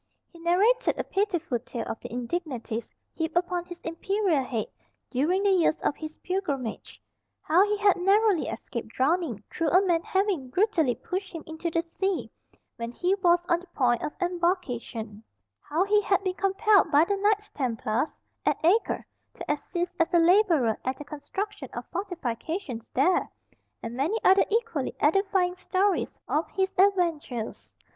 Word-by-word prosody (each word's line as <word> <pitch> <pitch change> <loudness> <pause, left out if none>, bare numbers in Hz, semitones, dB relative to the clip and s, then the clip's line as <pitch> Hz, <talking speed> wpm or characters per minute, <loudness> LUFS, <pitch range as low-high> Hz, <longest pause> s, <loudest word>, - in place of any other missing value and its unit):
He 340 - -14
narrated 400 +9 +3
a - - -1
pitiful 350 - -1
tale 235 -1 -6
of 225 - -4
the - - -9
indignities 245 -3 -4 0.2
heaped 320 +1 -2
upon 350 0 0
his 350 -1 -9
imperial 335 -2 0
head 230 -4 -2 0.5
during 330 +10 +1
the 400 - +4
years 340 -4 +3
of 290 - 0
his 310 0 -8
pilgrimage; 285 - -3 0.4
how 340 +5 +4
he 420 0 0
had 405 -2 +4
narrowly 395 0 +3
escaped 235 -3 -5
drowning 260 - 0
through 330 -2 0
a 370 +5 +4
man 340 -3 +2
having 380 -9 0
brutally 335 - +2
pushed 375 +1 -5
him 330 -3 -7
into 320 +2 -4
the 330 0 0
sea 380 +2 -2 0.5
when 235 0 -4
he 355 +9 0
was 345 -1 +4
on 345 -1 +2
the 365 - -15
point 240 -3 +2
of 300 - -3
embarkation; 310 - -2 0.4
how 320 +5 0
he 415 +1 +3
had 390 -1 +1
been 370 -2 0
compelled 395 +2 +3
by 295 +3 +6
the 400 +2 0
Knights 415 +1 +1
Templars, 235 - -1 0.3
at - - +2
Acre, 405 +7 +2 0.3
to - - -3
assist 345 +4 -3
as 330 - +2
a - - +8
labourer 335 - +4
at 260 +1 -2
the 295 - -8
construction 385 +8 -5
of - - -5
fortifications 320 - -4
there; 355 +8 +3 0.5
and 230 - -5
many 300 - 0
other 385 +1 +6
equally 435 - -1
edifying 380 +2 +2
stories 375 +1 0
of 310 +2 0
his 385 -1 -1
adventures. 335 - 0
345 Hz, 160 wpm, -27 LUFS, 280-390 Hz, 0.5 s, a